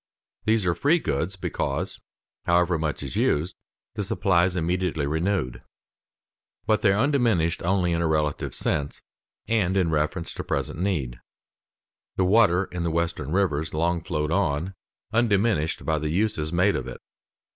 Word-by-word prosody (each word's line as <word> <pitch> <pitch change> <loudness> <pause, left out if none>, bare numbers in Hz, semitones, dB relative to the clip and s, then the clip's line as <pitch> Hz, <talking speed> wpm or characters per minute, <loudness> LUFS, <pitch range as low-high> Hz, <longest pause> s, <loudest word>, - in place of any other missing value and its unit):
These 110 -2 +2
are 90 - +2
free 145 - +3
goods 90 - -2
because, 95 - -3 0.5
however 85 -1 +2
much 75 -2 -2
is 70 - -6
used, 80 +5 +1 0.4
the 105 - -3
supply 95 -2 +2
is 90 0 -1
immediately 85 -3 0
renewed. 80 -3 -1 1.0
But 110 -1 +2
they 105 - +4
are 100 - +1
undiminished 115 - +2
only 90 0 +1
in 85 0 0
a 85 - +1
relative 75 -2 -1
sense 70 -1 -2 0.4
and 100 -4 +1
in 90 -4 +2
reference 80 +3 -1
to - - -5
present - - -2
need. 80 -11 -1 1.0
The 95 - +2
water 95 -2 +4
in 90 -1 -6
the 85 - 0
Western 85 -3 -2
rivers 80 -5 0
long 85 +2 +1
flowed 75 +1 -2
on, 90 -1 0 0.4
undiminished 105 -7 +1
by 80 -1 +1
the 75 0 -2
uses 85 -3 0
made 90 +4 +3
of - - -3
it. - - -7
85 Hz, 155 wpm, -25 LUFS, 80-100 Hz, 1.0 s, they